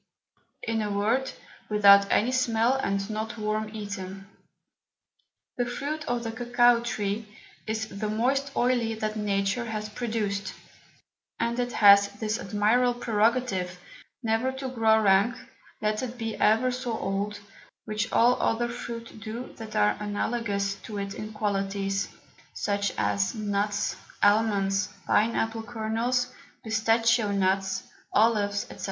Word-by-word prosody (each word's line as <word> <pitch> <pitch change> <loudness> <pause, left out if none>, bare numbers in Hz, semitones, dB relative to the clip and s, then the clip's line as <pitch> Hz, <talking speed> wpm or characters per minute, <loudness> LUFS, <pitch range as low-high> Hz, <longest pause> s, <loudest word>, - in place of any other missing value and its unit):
In 225 -1 -1
a 210 - -2
word, 225 +7 +1 0.4
without 200 -1 +7
any 235 +4 +3
Smell, 235 -1 +2
and 200 -7 -1
not 220 +1 -4
worm 215 0 -2
eaten. 195 -3 -6 1.3
The 245 -1 0
Fruit 295 +5 -3
of 240 -1 -1
the 225 - -3
Cocao 240 +1 +3
Tree 210 -2 -2 0.4
is 220 0 -2
the 210 +1 -4
most 265 +6 0
oily 240 -2 +1
that 215 0 -3
Nature 205 +2 0
has 215 -2 -4
produced, 210 -3 -3 0.8
and 235 +1 -1
it 245 0 -1
has 200 -1 +7
this 215 +1 -2
admirable 235 +5 +2
Prerogative, 220 -5 +1 0.5
never 225 +3 +1
to 265 0 -5
grow 225 -3 +3
rank 205 +3 +4 0.5
let 215 0 0
it 250 -1 -5
be 225 -2 -3
ever 225 +4 +3
so 245 -2 -3
old, 205 +1 -2 0.5
which 215 0 -2
all 245 +2 +4
other 240 +1 +1
Fruit 230 -1 -7
do 225 +4 -7
that 220 -2 -8
are 105 0 +3
analogous 205 -1 -1
to 210 - -7
it 200 0 -4
in 215 +1 -7
Qualities; 195 -1 -1 0.5
such 200 -1 0
as 100 -1 0
Nuts, 205 -1 -1 0.3
Almonds, 200 -2 +3 0.2
Pine 220 +2 +2
Apple 225 0 -1
Kernels, 235 +3 -1 0.3
Pistachoe 225 0 +2
Nuts, 190 0 +1 0.3
Olives, 205 -2 +2
&c. - - -11
220 Hz, 130 wpm, -27 LUFS, 200-235 Hz, 1.3 s, without